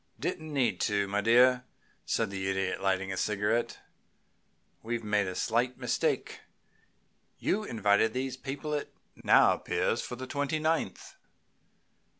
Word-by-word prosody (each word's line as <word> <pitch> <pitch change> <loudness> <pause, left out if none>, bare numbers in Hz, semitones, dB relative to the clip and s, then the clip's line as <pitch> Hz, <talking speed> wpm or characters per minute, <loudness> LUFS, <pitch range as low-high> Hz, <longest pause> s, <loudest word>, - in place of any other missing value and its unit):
"Didn't 155 -1 -4
need 135 -4 0
to, 100 -1 +1
my 100 +1 0
dear," 125 +3 +5 0.4
said 110 -3 0
the 95 -1 -2
Idiot, 95 0 -1
lighting 95 0 0
a - - -5
cigarette. 105 +4 0 1.0
"We've 115 0 -3
made 105 -2 +1
a 95 - -4
slight 120 +5 0
mistake. - - -1 1.0
You 210 +2 0
invited 110 - +2
these 130 +2 -3
people, 140 +3 -5
it 145 - -3 0.3
now - - +6
appears, - - -1
for - - -6
the 130 +2 -6
twenty 145 +4 -1
ninth." 155 - -2
115 Hz, 135 wpm, -30 LUFS, 100-130 Hz, 1.0 s, now